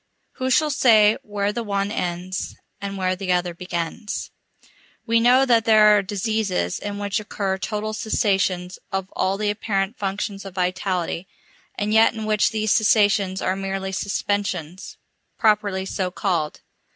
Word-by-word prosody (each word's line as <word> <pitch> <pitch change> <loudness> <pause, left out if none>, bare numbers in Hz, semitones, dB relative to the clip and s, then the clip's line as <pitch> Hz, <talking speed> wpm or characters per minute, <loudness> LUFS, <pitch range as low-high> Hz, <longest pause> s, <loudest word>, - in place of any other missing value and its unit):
Who 260 0 -1
shall 305 +3 +3
say 220 -6 +5
where 205 0 -2
the 235 - -2
one 200 -2 -1
ends, 180 -1 -3 0.3
and 200 0 -4
where 185 -1 0
the 185 0 -3
other 180 -1 +1
begins? 175 +4 -4 0.7
We 230 0 +3
know 250 +3 +5
that 230 -3 +3
there 215 -1 +6
are 205 - +3
diseases 200 - -1
in 205 0 -5
which 205 +1 -1
occur 195 -2 -3
total 215 +1 -3
cessations 190 -5 0
of 190 0 -3
all 190 +1 0
the 210 0 0
apparent 205 0 -2
functions 200 0 -3
of 195 -2 -10
vitality, 180 -1 -1 0.5
and 210 +1 -1
yet 220 +1 +5
in 220 -1 -4
which 215 -1 +2
these 215 -1 -1
cessations 205 -4 +3
are 185 - +1
merely 195 0 -3
suspensions, 190 -3 -3 0.4
properly 205 -4 +2
so 190 -1 -2
called. 175 -5 -2
200 Hz, 150 wpm, -22 LUFS, 185-215 Hz, 0.7 s, there